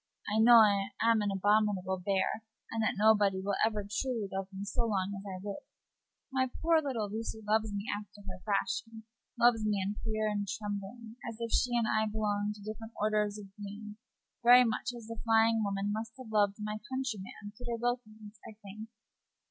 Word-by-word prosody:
"I - - +3
know 235 +2 +8
I 200 -3 +6 0.2
am 230 -1 +4
an 205 - 0
abominable 195 -2 +1
bear, 195 +2 0 0.3
and 225 - -1
that 220 - +1
nobody 205 -2 +4
will 200 +1 -2
ever 215 -2 +1
truly 220 +1 -2
love 195 0 -3
me 195 +1 -6
so 230 +3 -1
long 200 -2 -1
as 195 - -7
I 190 -1 -5
live. 200 +7 -5 0.7
My 260 -1 +1
poor 330 -1 +4
little 250 -8 -2
Lucy 220 +1 -5
loves 220 0 +2
me 200 0 -4
after 205 0 -10
her 185 -2 -8
fashion 220 +2 -2 0.4
loves 235 -2 +5
me 210 -2 +1
in 195 +2 -1
fear 215 -1 -1
and 205 -1 -1
trembling, 210 +2 -5
as 225 - -8
if 230 -1 -3
she 240 -1 +2
and 235 - +2
I 220 0 +2
belonged 210 -1 -1
to 205 - -13
different 220 +2 -7
orders 210 -1 +1
of 195 -2 -12
beings 210 +1 -8 0.4
very 245 +1 +8
much 225 +1 -1
as 240 -2 -10
the 230 -1 -7
flying 225 0 +4
woman 200 0 -1
must 225 +1 -4
have 255 -4 -10
loved 205 -2 +3
my 210 0 -4
countryman, 215 -5 -5
Peter 240 +1 -4
Wilkins, 220 -3 -4
I 215 - -13
think. 215 +3 -9
215 Hz, 190 wpm, -31 LUFS, 205-225 Hz, 0.7 s, know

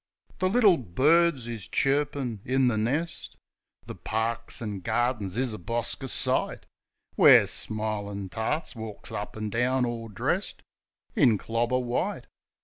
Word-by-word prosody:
The 185 - +1
little 205 -5 +5
birds 140 - +2
is 115 -5 -6
chirpin' 140 -4 0
in 130 0 +2
the 115 - -1
nest, 135 +10 -2 0.5
The - - -7
parks, 110 +2 -3
an' 105 -4 -5
gardings 115 -2 -1
is 125 -3 0
a 105 - -7
bosker 120 +7 -3
sight, - - +2 0.5
Where - - +7
smilin' 105 -2 -3
tarts 135 - -3
walks 110 -2 -8
up 105 +1 -6
an' 110 -1 -4
down, 125 +3 +1
all 115 -1 -4
dressed 105 -4 -3 0.5
In 110 -4 +4
clobber 115 +5 -1
white. 125 -1 -2
120 Hz, 135 wpm, -27 LUFS, 110-130 Hz, 0.5 s, Where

